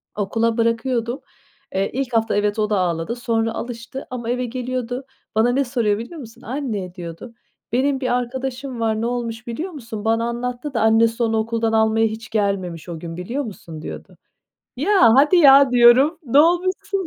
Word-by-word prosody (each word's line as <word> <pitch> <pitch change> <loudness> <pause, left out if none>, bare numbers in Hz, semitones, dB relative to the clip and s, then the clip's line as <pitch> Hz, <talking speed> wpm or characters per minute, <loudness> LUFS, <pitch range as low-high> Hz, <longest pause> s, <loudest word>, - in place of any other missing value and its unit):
Okula 225 +3 0
bırakıyordum. 230 +2 0 0.5
Eee, 195 +1 +1
ilk 260 -2 -3
hafta, 225 -1 +1
evet, 205 +1 0
o 210 0 +1
da 205 - +1
ağladı. 175 +4 -1
Sonra 225 -2 -1
alıştı 240 +3 -7
ama 235 -2 -5
eve 250 +1 -1
geliyordu. 250 +1 -4 0.3
Bana 230 +3 +3
ne 275 +2 +2
soruyor 235 -5 0
biliyor 270 +9 -8
musun? 230 -4 -12
"Anne" 215 -8 -4
diyordu. 170 +6 -8 0.4
"Benim 265 +2 +1
bir 255 -2 0
arkadaşım 255 +1 -4
var, 220 -1 0
ne - - -1
olmuş 240 -1 -4
biliyor 310 +11 -4
musun? 230 -8 -8
Bana 225 +1 +2
anlattı 250 +3 -4
da 230 - 0
annesi 225 +1 +3
onu 225 -1 +1
okuldan 225 0 -1
almaya 220 0 +3
hiç 220 +1 -7
gelmemiş 195 -6 -2
o 165 -2 -6
gün 165 0 -7
biliyor 240 +11 -3
musun?" 170 - -9
diyordu. - - -9 0.6
"Ya, 350 - +4
hadi 295 +6 +5
ya!" 275 -4 +7
diyorum. 250 +6 +5
Ne 275 +3 +5
olmuşsun? 370 +3 +1
235 Hz, 170 wpm, -21 LUFS, 220-260 Hz, 0.6 s, ya